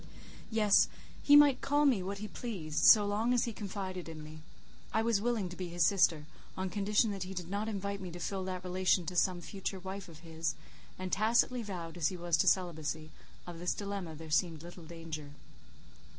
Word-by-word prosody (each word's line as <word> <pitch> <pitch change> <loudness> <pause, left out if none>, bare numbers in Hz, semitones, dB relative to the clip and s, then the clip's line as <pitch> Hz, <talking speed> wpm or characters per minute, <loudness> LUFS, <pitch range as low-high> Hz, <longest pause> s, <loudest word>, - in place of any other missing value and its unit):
Yes; 215 -3 +4 0.3
he 290 - +6
might 290 -3 +7
call 290 +1 +2
me 250 -9 +4
what 195 +2 -4
he 215 +2 -5
pleased, 185 -9 -3
so 210 -2 +8
long 220 +5 +1
as 245 - +3
he 235 - -4
confided 190 -4 -5
in 155 -1 -8
me. 155 +1 -10 0.5
I 220 - +1
was 225 -3 +2
willing 230 -4 0
to 175 - -8
be 180 0 -5
his 170 -1 +1
sister, 165 -5 +3 0.3
on 185 -1 -2
condition 210 +3 +2
that 195 -1 -5
he 190 +1 -5
did 180 0 -5
not 205 +2 -2
invite 200 -1 -3
me 185 - -5
to 175 +1 -8
fill 190 +2 -3
that 185 -1 -4
relation 185 -1 +1
to 180 - -5
some 180 0 +2
future 195 +1 -5
wife 190 0 -7
of 160 -1 -13
his; 160 -2 -3 0.4
and 185 0 -5
tacitly 235 +4 +2
vowed 180 -6 -6
as 160 -3 +2
he 185 - -3
was 175 -1 +1
to - - +2
celibacy, 160 -3 0 0.3
of 175 -2 -8
this 175 +1 -1
dilemma 200 -5 -5
there 160 0 -10
seemed 160 -1 +1
little 175 -1 -11
danger. 160 -3 -7
185 Hz, 205 wpm, -32 LUFS, 170-205 Hz, 0.5 s, so